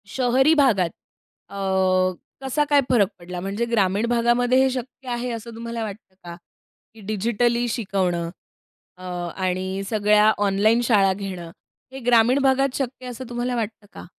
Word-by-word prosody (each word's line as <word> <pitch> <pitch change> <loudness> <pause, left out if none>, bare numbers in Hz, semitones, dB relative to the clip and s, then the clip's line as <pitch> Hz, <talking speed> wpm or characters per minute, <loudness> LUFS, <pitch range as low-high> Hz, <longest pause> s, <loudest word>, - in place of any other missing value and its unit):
शहरी 260 +6 +3
भागात 225 - +3 0.6
अ, - - -11 0.9
कसा 270 +3 +1
काय 290 -1 +5
फरक 220 -6 +4
पडला? 175 +1 -7
म्हणजे 200 +5 -2
ग्रामीण 205 -1 +2
भागामध्ये 240 +1 +2
हे 265 - +3
शक्य 260 +1 -7
आहे, 240 +1 -2
असं 230 0 -7
तुम्हाला 230 0 -5
वाटतं 200 -2 -9
का? 170 -1 -8 0.6
की 220 - -15
डिजिटली 235 +3 0
शिकवणं 185 -7 -1 0.7
अ, 185 - -13 0.3
आणि 185 +1 -2
सगळ्या 210 0 +4
ऑनलाईन 205 +3 +2
शाळा 200 -5 +3
घेणं. 185 -4 -7 0.4
हे 265 - -8
ग्रामीण 245 +2 +4
भागात 270 0 +2
शक्य 255 -1 -4
असं 250 0 -8
तुम्हाला 240 +1 -2
वाटतं 220 -2 -4
का? - - -10
230 Hz, 145 wpm, -23 LUFS, 195-245 Hz, 0.9 s, काय